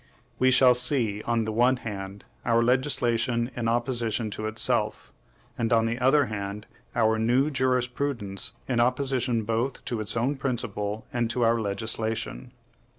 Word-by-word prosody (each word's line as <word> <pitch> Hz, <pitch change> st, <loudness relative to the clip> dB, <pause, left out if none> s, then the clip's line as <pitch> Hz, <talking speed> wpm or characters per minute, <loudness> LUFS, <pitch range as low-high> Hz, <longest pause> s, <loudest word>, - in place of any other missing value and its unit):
We 130 Hz, -, +4 dB
shall 130 Hz, -1 st, +6 dB
see, 120 Hz, -4 st, +1 dB
on 115 Hz, -1 st, +1 dB
the 110 Hz, -, -2 dB
one 120 Hz, +4 st, +3 dB
hand, 100 Hz, -4 st, -7 dB, 0.2 s
our 115 Hz, 0 st, +3 dB
legislation 120 Hz, -1 st, +1 dB
in 120 Hz, -2 st, -2 dB
opposition 115 Hz, -2 st, 0 dB
to 110 Hz, +2 st, -4 dB
itself; 110 Hz, +1 st, 0 dB, 0.5 s
and, 115 Hz, 0 st, 0 dB
on 115 Hz, -1 st, +4 dB
the 115 Hz, +2 st, -2 dB
other 135 Hz, +3 st, +4 dB
hand, 105 Hz, -1 st, -5 dB, 0.3 s
our 110 Hz, 0 st, +2 dB
new 125 Hz, +6 st, +2 dB
jurisprudence 125 Hz, -5 st, -1 dB
in 125 Hz, -3 st, 0 dB
opposition 125 Hz, -2 st, +1 dB
both 115 Hz, +5 st, -2 dB
to 120 Hz, -, -2 dB
its 110 Hz, +2 st, -3 dB
own 130 Hz, +5 st, 0 dB
principle 110 Hz, -5 st, -3 dB
and 120 Hz, -2 st, 0 dB
to 120 Hz, +1 st, 0 dB
our 115 Hz, 0 st, +3 dB
legislation. 110 Hz, -, -3 dB
115 Hz, 150 wpm, -26 LUFS, 110-125 Hz, 0.5 s, shall